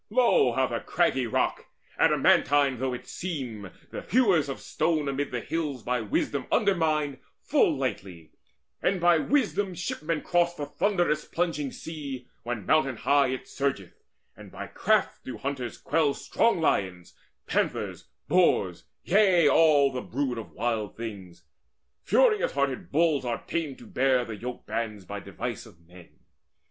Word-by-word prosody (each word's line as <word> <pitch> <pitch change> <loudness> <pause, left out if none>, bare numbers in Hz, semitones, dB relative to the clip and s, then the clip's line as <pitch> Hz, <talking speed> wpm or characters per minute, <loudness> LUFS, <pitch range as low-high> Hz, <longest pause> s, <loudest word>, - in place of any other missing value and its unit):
Lo, 235 - +4
how 130 +2 +2
the 115 -2 -3
craggy 135 -8 +1
rock, 110 - -1 0.3
Adamantine 140 -3 +3
though 130 0 -1
it 125 - -6
seem, 125 - -5 0.2
the - - -5
hewers 195 - +2
of 135 - -5
stone 155 -2 -1
Amid 140 +1 -2
the 125 -1 -3
hills 150 -5 -3
by 125 -1 -1
wisdom 115 +6 -1
undermine 155 -8 +1 0.2
Full 220 - +2
lightly, 95 -10 -5 0.5
and 190 0 +1
by 175 -1 +4
wisdom 205 - 0
shipmen 165 -2 -3
cross 175 0 +1
The 150 - -4
thunderous 175 -2 0
plunging 165 -5 -2
sea, 140 -6 -7
when 115 -4 -4
mountain 135 -6 +2
high 140 +2 +3
It 130 0 -4
surgeth, 135 -10 -2 0.4
and - - -13
by - - -7
craft - - 0
do 130 - -7
hunters 135 -3 -4
quell 145 0 +1
Strong 230 -6 +1
lions, 90 - -1 0.3
panthers, - - -2 0.2
boars, 100 - +2 0.2
yea, 185 -4 +4
all 145 -2 +5
the 125 -1 -4
brood 130 -2 -2
Of 110 - -8
wild 110 -2 -3
things. 100 -6 -8 0.6
Furious 480 -4 +3
hearted 140 -2 -2
bulls 155 -2 +2
are 120 -2 -3
tamed 155 -6 -3
To - - -13
bear 130 -1 +1
the 115 - -6
yoke 125 +4 -7
bands 105 -4 -4
by 100 +3 -6
device 105 +5 -6
of 95 -7 -18
men. 90 -1 -15
140 Hz, 150 wpm, -27 LUFS, 120-165 Hz, 0.6 s, all